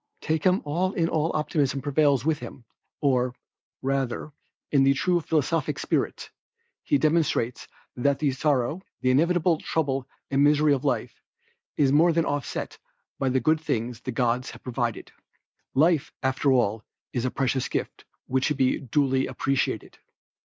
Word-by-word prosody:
Take 155 Hz, 0 st, -1 dB
him 185 Hz, +1 st, +3 dB
all 175 Hz, +6 st, 0 dB
in 165 Hz, -2 st, +1 dB
all 160 Hz, 0 st, 0 dB
optimism 150 Hz, -3 st, 0 dB
prevails 140 Hz, -2 st, +2 dB
with 155 Hz, -1 st, +1 dB
him, 120 Hz, -, -10 dB, 0.4 s
or 125 Hz, -3 st, +1 dB, 0.5 s
rather, 135 Hz, +1 st, -1 dB, 0.4 s
in 135 Hz, -1 st, +5 dB
true 175 Hz, +4 st, +1 dB
philosophic 160 Hz, +1 st, 0 dB
spirit, -, -, -2 dB, 0.5 s
he 290 Hz, -, +2 dB
demonstrates 155 Hz, -, +1 dB, 0.3 s
that 140 Hz, +2 st, +1 dB
the 145 Hz, -3 st, +1 dB
sorrow, 140 Hz, +3 st, 0 dB, 0.2 s
the 130 Hz, -, +3 dB
inevitable 165 Hz, +3 st, +3 dB
trouble 135 Hz, -4 st, -1 dB, 0.2 s
and 140 Hz, +1 st, +3 dB
misery 150 Hz, 0 st, +4 dB
of 135 Hz, -, -1 dB
life, -, -, -2 dB, 0.6 s
is 140 Hz, -2 st, +3 dB
more 165 Hz, +4 st, +5 dB
than 165 Hz, 0 st, +1 dB
offset 145 Hz, -2 st, -3 dB, 0.4 s
by 135 Hz, -, +1 dB
the 130 Hz, +1 st, +2 dB
good 155 Hz, +5 st, +2 dB
things 120 Hz, -6 st, -2 dB
the 130 Hz, -, -4 dB
gods 125 Hz, +1 st, 0 dB
have -, -, -12 dB
provided. 120 Hz, -2 st, -3 dB, 0.6 s
Life, 155 Hz, +1 st, +3 dB
after 130 Hz, +1 st, +2 dB
all, 115 Hz, -4 st, +1 dB, 0.3 s
is 120 Hz, -, -1 dB
a 130 Hz, -, +1 dB
precious 130 Hz, 0 st, -1 dB
gift, -, -, -4 dB, 0.2 s
which 130 Hz, 0 st, 0 dB
should 150 Hz, -, 0 dB
be 130 Hz, -1 st, +2 dB
duly 135 Hz, 0 st, +1 dB
appreciated. 135 Hz, +1 st, -2 dB
140 Hz, 150 wpm, -26 LUFS, 130-155 Hz, 0.6 s, in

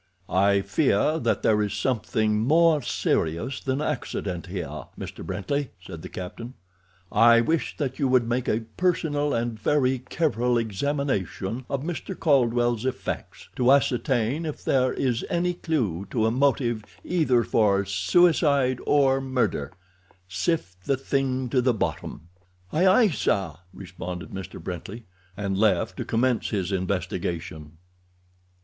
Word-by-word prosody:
"I 100 Hz, +1 st, +4 dB
fear 150 Hz, +9 st, +1 dB
that -, -, 0 dB
there 105 Hz, -1 st, +3 dB
is 105 Hz, 0 st, -1 dB
something 110 Hz, -1 st, 0 dB
more 155 Hz, +5 st, +4 dB
serious 115 Hz, -, -1 dB
than 135 Hz, +2 st, -2 dB
accident 95 Hz, -, -3 dB
here, 80 Hz, -7 st, -5 dB
Mr. -, -, -7 dB
Brently," 140 Hz, +5 st, -2 dB
said 90 Hz, -3 st, -9 dB
the -, -, -8 dB
captain. 115 Hz, +7 st, -7 dB, 0.6 s
"I 115 Hz, 0 st, +6 dB
wish 160 Hz, +6 st, -1 dB
that 140 Hz, -2 st, -3 dB
you 140 Hz, -, +2 dB
would 125 Hz, -2 st, +3 dB
make 120 Hz, +1 st, -1 dB
a 110 Hz, -, +1 dB, 0.2 s
personal 155 Hz, -5 st, +1 dB
and 115 Hz, -2 st, -2 dB
very 130 Hz, +1 st, +2 dB
careful 125 Hz, -3 st, 0 dB
examination 115 Hz, -, -2 dB
of 140 Hz, -1 st, -2 dB
Mr. 175 Hz, +3 st, -5 dB
Caldwell's 120 Hz, -5 st, +2 dB
effects, 130 Hz, -1 st, -4 dB
to 125 Hz, +1 st, +4 dB
ascertain 130 Hz, 0 st, +2 dB
if 155 Hz, -2 st, -5 dB
there 130 Hz, -1 st, +2 dB
is 125 Hz, -3 st, -1 dB
any 175 Hz, +1 st, +1 dB
clew 110 Hz, -, -2 dB
to 110 Hz, -3 st, 0 dB
a 110 Hz, -, +2 dB
motive 125 Hz, -3 st, +1 dB, 0.2 s
either 150 Hz, -9 st, +2 dB
for 100 Hz, 0 st, +2 dB
suicide 135 Hz, -, +3 dB
or 135 Hz, -2 st, +3 dB
murder—sift 95 Hz, -, -3 dB
the 135 Hz, -, +1 dB
thing 130 Hz, -1 st, -1 dB
to 125 Hz, 0 st, +2 dB
the 125 Hz, -2 st, +2 dB
bottom." 95 Hz, -7 st, -3 dB, 0.5 s
"Aye, 175 Hz, +5 st, +3 dB
aye, 210 Hz, +4 st, +5 dB
sir!" 100 Hz, -, 0 dB, 0.2 s
responded 90 Hz, -2 st, -7 dB
Mr. 95 Hz, -1 st, -7 dB
Brently, 95 Hz, +6 st, -7 dB, 0.3 s
and 100 Hz, -1 st, -2 dB
left 100 Hz, -5 st, +2 dB
to -, -, -4 dB
commence 120 Hz, +1 st, +1 dB
his 95 Hz, -3 st, -2 dB
investigation. 90 Hz, -4 st, -3 dB
120 Hz, 135 wpm, -25 LUFS, 95-140 Hz, 0.6 s, I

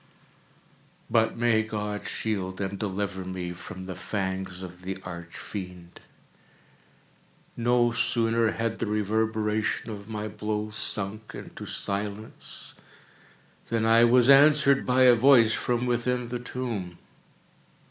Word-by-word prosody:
But 110 Hz, -1 st, +2 dB
may 115 Hz, -2 st, +3 dB
God 105 Hz, -1 st, -4 dB
shield 95 Hz, -4 st, -3 dB
and 100 Hz, 0 st, -3 dB
deliver 100 Hz, -2 st, -3 dB
me 90 Hz, -1 st, -5 dB
from 90 Hz, +2 st, -9 dB
the 95 Hz, -, -5 dB
fangs 95 Hz, -1 st, -4 dB
of 90 Hz, 0 st, -10 dB
the 95 Hz, +1 st, -5 dB
Arch 85 Hz, -1 st, -8 dB
Fiend! 90 Hz, -3 st, -8 dB, 1.6 s
No 120 Hz, 0 st, +2 dB
sooner 115 Hz, 0 st, +1 dB
had 115 Hz, 0 st, -2 dB
the 115 Hz, -, -1 dB
reverberation 110 Hz, +1 st, 0 dB
of 100 Hz, 0 st, -9 dB
my 105 Hz, -1 st, -4 dB
blows 105 Hz, 0 st, -4 dB
sunk 105 Hz, +1 st, -4 dB
into -, -, -9 dB
silence, 100 Hz, +2 st, -5 dB, 1.0 s
than 115 Hz, -1 st, 0 dB
I 115 Hz, +1 st, +6 dB
was 120 Hz, +1 st, +5 dB
answered 140 Hz, 0 st, +6 dB
by 130 Hz, +1 st, +4 dB
a 125 Hz, -1 st, +8 dB
voice 120 Hz, -2 st, +6 dB
from 120 Hz, 0 st, -1 dB
within 125 Hz, 0 st, -1 dB
the 120 Hz, 0 st, -3 dB
tomb! 115 Hz, -8 st, -5 dB
110 Hz, 120 wpm, -27 LUFS, 95-120 Hz, 1.6 s, a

